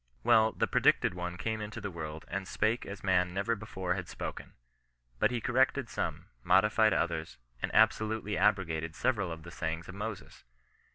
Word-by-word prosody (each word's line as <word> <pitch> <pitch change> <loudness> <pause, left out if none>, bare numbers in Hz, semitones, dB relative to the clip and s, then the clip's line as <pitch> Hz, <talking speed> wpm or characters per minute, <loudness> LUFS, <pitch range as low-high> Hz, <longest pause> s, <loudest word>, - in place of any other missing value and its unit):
Well, 110 0 +5
the - - +1
predicted - - +3
one 90 0 -5
came 110 +3 -2
into 105 0 -6
the 100 - -5
world 80 -2 -6
and 95 0 -4
spake 110 +4 0
as 100 +1 -8
man 90 -1 +2
never 100 +4 0
before 95 -4 -3
had 90 -2 -4
spoken. - - -6 0.7
But - - +4
he 125 -1 -1
corrected 130 +1 +1
some, - - -3 0.2
modified 105 +4 +4
others, 85 -1 -1 0.2
and - - -1
absolutely 110 -1 +3
abrogated 80 -4 +1
several 100 -1 0
of 80 -1 -7
the 85 - -10
sayings 80 0 -4
of 95 - -8
Moses. 105 0 -6
95 Hz, 170 wpm, -31 LUFS, 85-110 Hz, 0.7 s, Well